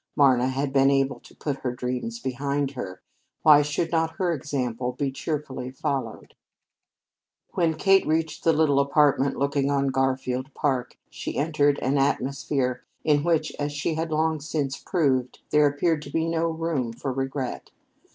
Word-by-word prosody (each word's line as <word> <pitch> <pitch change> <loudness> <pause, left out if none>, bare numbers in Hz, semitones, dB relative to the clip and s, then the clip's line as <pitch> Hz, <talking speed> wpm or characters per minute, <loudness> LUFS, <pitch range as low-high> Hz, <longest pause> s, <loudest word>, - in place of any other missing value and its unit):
Marna 130 -3 +4
had 135 +1 -2
been 135 0 +5
able 135 0 +1
to - - -18
put 145 -3 -3
her 125 -2 -3
dreams 125 - -3
behind 140 - -2
her; 95 -9 -7 0.4
why 150 -2 +8
should 150 +3 -1
not 160 -1 0
her 180 -2 0
example 125 -4 -2
be 135 +1 -2
cheerfully 135 -3 -4
followed? 135 +1 -4 1.2
When 165 -3 +1
Kate 195 +2 +4
reached 160 0 -1
the 165 - +5
little 150 -3 +3
apartment 140 -1 +3
looking 140 0 +1
on 140 -1 +1
Garfield 130 0 -1
Park, 130 -4 -1
she - - -5
entered 145 -1 +2
an 135 +2 +2
atmosphere 135 -1 0 0.2
in 145 -2 +3
which, 160 -2 +1
as 145 0 -2
she 145 +3 -1
had 160 +1 -2
long 160 0 +1
since 145 -3 -2
proved, 130 -8 0
there 150 -1 +5
appeared 150 +2 +1
to 140 - -9
be 160 +3 0
no 165 0 0
room 160 -7 -2
for 130 +3 -4
regret. 135 0 -3
140 Hz, 160 wpm, -25 LUFS, 135-155 Hz, 1.2 s, why